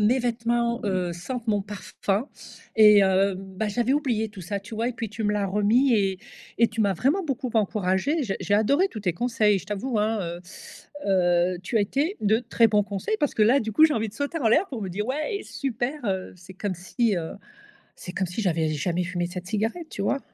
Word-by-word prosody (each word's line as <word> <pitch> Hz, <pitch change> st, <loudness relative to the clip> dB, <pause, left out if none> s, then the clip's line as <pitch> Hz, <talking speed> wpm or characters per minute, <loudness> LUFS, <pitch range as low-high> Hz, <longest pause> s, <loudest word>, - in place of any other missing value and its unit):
mes 230 Hz, +5 st, +3 dB
vêtements, 235 Hz, 0 st, 0 dB
heu, 185 Hz, -3 st, 0 dB
sentent 230 Hz, +8 st, -6 dB
mon 205 Hz, -2 st, +1 dB
parfum 200 Hz, +3 st, -3 dB, 0.5 s
et 210 Hz, -2 st, +7 dB
heu, 190 Hz, +1 st, +3 dB
bah, 195 Hz, +2 st, -4 dB
j'avais 240 Hz, +4 st, +1 dB
oublié 240 Hz, -7 st, 0 dB
tout 200 Hz, -2 st, -11 dB
ça 200 Hz, +4 st, -3 dB
tu 210 Hz, +2 st, -10 dB
vois? 230 Hz, +3 st, 0 dB
Et -, -, -3 dB
puis 225 Hz, -1 st, -4 dB
tu 220 Hz, +2 st, -6 dB
me 210 Hz, -, +2 dB
l'as 205 Hz, -1 st, 0 dB
remis 215 Hz, +7 st, +3 dB
et 195 Hz, -3 st, +1 dB, 0.4 s
et 230 Hz, -, +6 dB
tu 225 Hz, +1 st, -4 dB
m'as 200 Hz, -3 st, +2 dB
vraiment 290 Hz, -, +1 dB
beaucoup 260 Hz, -4 st, -3 dB
encouragée, 210 Hz, -, +1 dB
j'ai 195 Hz, -5 st, -2 dB
j'ai 205 Hz, -, +1 dB
adoré 280 Hz, -, +3 dB
tous 215 Hz, -, -7 dB
tes 180 Hz, -4 st, 0 dB
conseils. 215 Hz, -1 st, +2 dB
Je -, -, -14 dB
t'avoue 210 Hz, +3 st, -2 dB
hein, 220 Hz, +1 st, +1 dB
heu, 170 Hz, 0 st, -5 dB, 0.7 s
heu, 180 Hz, -1 st, +2 dB
tu 225 Hz, +6 st, -2 dB
as -, -, +4 dB
été 295 Hz, -, -1 dB
de 215 Hz, +2 st, +3 dB
très 230 Hz, -1 st, +3 dB
bon 210 Hz, -1 st, +3 dB
conseil. 200 Hz, -, -3 dB
Parce 290 Hz, -, +1 dB
que 215 Hz, -, +2 dB
là 260 Hz, +6 st, +4 dB
du 220 Hz, -1 st, -3 dB
coup 310 Hz, +9 st, +6 dB
j'ai 310 Hz, -, +4 dB
envie 225 Hz, -1 st, -1 dB
de 205 Hz, -, -13 dB
sauter 285 Hz, +6 st, -3 dB
en 230 Hz, -, +3 dB
l'air 320 Hz, -, +4 dB
pour 235 Hz, -6 st, -5 dB
me 190 Hz, -, -3 dB
dire: 210 Hz, +5 st, -3 dB
«Ouais 305 Hz, +9 st, -2 dB
super», 260 Hz, 0 st, -3 dB
heu, 190 Hz, -1 st, -2 dB
c'est 180 Hz, +1 st, -13 dB
comme 195 Hz, 0 st, -3 dB
si, 205 Hz, +5 st, 0 dB
heu 160 Hz, -1 st, -4 dB, 0.6 s
c'est 180 Hz, -, -8 dB
comme 190 Hz, -1 st, -1 dB
si 180 Hz, +6 st, -4 dB
j'avais 165 Hz, -4 st, +1 dB
jamais 170 Hz, +4 st, -1 dB
fumé 175 Hz, -1 st, -2 dB
cette 180 Hz, 0 st, -7 dB
cigarette, 225 Hz, -, -2 dB
tu 200 Hz, -, -4 dB
vois? 275 Hz, +7 st, 0 dB
210 Hz, 225 wpm, -25 LUFS, 190-240 Hz, 0.7 s, et